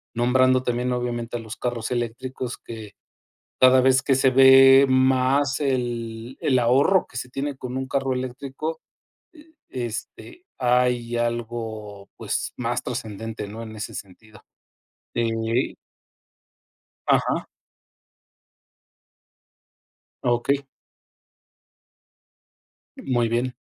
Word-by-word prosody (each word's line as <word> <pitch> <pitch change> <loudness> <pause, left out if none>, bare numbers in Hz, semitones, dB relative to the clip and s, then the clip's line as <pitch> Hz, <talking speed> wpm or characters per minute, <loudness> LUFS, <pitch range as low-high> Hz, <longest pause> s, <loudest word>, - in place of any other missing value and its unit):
nombrando 130 +1 +3
también, 125 0 -1
obviamente, 120 -1 -3
a - - -7
los 110 +1 -8
carros 120 -2 -3
eléctricos, 120 +1 -4
que 110 -3 -10 0.7
cada 130 0 +7
vez 130 0 +4
que 135 0 +2
se 135 0 +3
ve 135 +1 +8
más 130 +2 +2
el 120 -2 -3
el 130 - +2
ahorro 135 +10 +3
que 125 - -9
se 125 - -5
tiene 140 +2 -3
con 125 0 -6
un 130 0 -3
carro 135 -1 0
eléctrico. 135 +5 -5 0.6
Eh, 315 +1 -18 0.2
este, 125 - -7
hay 125 -1 +1
algo, 115 -4 -4
pues, - - -3
más 120 0 -2
trascendente, 115 -3 -5
¿no?, 110 +3 -8
en 110 -1 -9
ese 105 - -6
sentido 105 +2 -11 0.7
ey. 115 +1 0 1.3
Ajá. - - +2 2.8
Okey. 125 +3 +1 2.3
Muy 120 -3 0
bien. 120 +2 -1
125 Hz, 100 wpm, -24 LUFS, 115-130 Hz, 2.8 s, ve